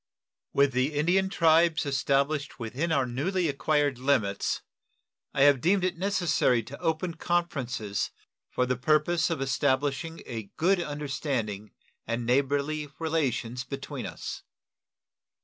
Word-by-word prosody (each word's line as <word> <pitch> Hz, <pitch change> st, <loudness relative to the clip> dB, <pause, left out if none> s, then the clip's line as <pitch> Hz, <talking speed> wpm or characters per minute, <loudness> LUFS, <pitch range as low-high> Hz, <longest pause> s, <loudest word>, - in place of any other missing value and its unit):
With 140 Hz, 0 st, +3 dB
the 130 Hz, +4 st, 0 dB
Indian 180 Hz, +6 st, +2 dB
tribes 165 Hz, -2 st, +4 dB
established 140 Hz, +1 st, 0 dB
within 130 Hz, +9 st, -2 dB
our 140 Hz, -4 st, +2 dB
newly 165 Hz, +9 st, -1 dB
acquired 145 Hz, -2 st, +1 dB
limits, 110 Hz, -7 st, +1 dB, 0.7 s
I 135 Hz, -, +2 dB
have 140 Hz, -3 st, +5 dB
deemed 190 Hz, +4 st, +3 dB
it 185 Hz, -1 st, 0 dB
necessary 170 Hz, -, +2 dB
to 140 Hz, +6 st, -10 dB
open 165 Hz, +1 st, -1 dB
conferences 135 Hz, -, -1 dB, 0.4 s
for 125 Hz, -, 0 dB
the 125 Hz, 0 st, 0 dB
purpose 155 Hz, +6 st, +2 dB
of 165 Hz, -5 st, -2 dB
establishing 140 Hz, +4 st, 0 dB
a 110 Hz, -5 st, -6 dB
good 180 Hz, +3 st, +3 dB
understanding 135 Hz, -9 st, -3 dB, 0.3 s
and 115 Hz, +1 st, -2 dB
neighborly 140 Hz, +4 st, +1 dB
relations 135 Hz, -7 st, -1 dB
between 135 Hz, +1 st, -6 dB
us. -, -, -6 dB
145 Hz, 120 wpm, -28 LUFS, 130-165 Hz, 0.7 s, have